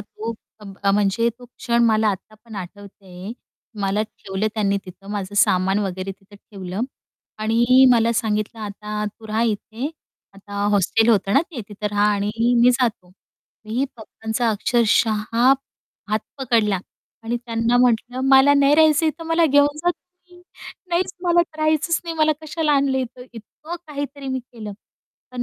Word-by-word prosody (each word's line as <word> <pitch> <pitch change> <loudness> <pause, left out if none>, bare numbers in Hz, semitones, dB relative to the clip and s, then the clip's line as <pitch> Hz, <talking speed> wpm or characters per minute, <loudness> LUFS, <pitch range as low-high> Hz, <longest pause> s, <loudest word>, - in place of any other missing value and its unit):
तो 215 +2 -6 0.3
अ, 210 - -12 0.2
अ, 195 - +3
म्हणजे 205 +3 +2
तो 250 - -13
क्षण 235 -1 0
मला 220 -1 +3
आत्ता 205 +2 -4
पण 225 -2 -12
आठवते 200 +1 -10
आहे. 185 +4 -8 0.5
मला 200 +2 +1
ठेवलं 200 -1 -4
त्यांनी 200 -2 +1
तिथं 190 +2 -13
माझं 205 -1 -4
सामान 190 0 +3
वगैरे 190 -1 -3
तिथं 195 +2 -21
ठेवलं. 195 -1 -7 0.6
आणि 240 +4 +4
मला 230 0 +3
सांगितलं, 215 -1 -1
"आता 210 0 -5
तू 220 +2 -9
राहा 220 +2 0
इथे." 220 +3 -2 0.5
आता 200 +1 -14 0.2
हॉस्टेल 210 +3 +2
होतं 200 -3 +3
ना 275 - +6
ते 280 -8 -6
तिथं 210 0 -5
रहा 205 0 +2
आणि 200 +1 -1 0.3
मी 250 - +7
जातो. 240 -7 -1 0.6
मी 230 +5 -1
पप्पांचा 225 +1 -2
अक्षरशः 220 0 +2 0.9
हात 215 +1 +1 0.2
पकडला 225 -7 +1 0.4
आणि 230 +2 -2
त्यांना 235 0 0
म्हटलं, 245 +1 +1
"मला 270 +1 +7
नाही 280 +1 +5
राहायचं 315 0 +4
इथं, 310 +2 -3
मला 330 +1 +3
घेऊन 285 0 +3
जा 350 +3 +1
तुम्ही, 360 0 -15 0.5
नाहीच 355 +2 0
मला 345 -1 +4 0.2
राहायचंच 310 +1 +1
नाही 335 - -4
मला 310 0 +3
कशाला 310 -1 -1
आणलं 275 -2 +2
इथं?" 250 0 -5
इतकं 300 +9 -9
काहीतरी 285 -2 -6
मी 260 0 -1
केलं. 225 -4 -9 0.6
पण 250 -1 -4
225 Hz, 155 wpm, -21 LUFS, 205-275 Hz, 0.9 s, मी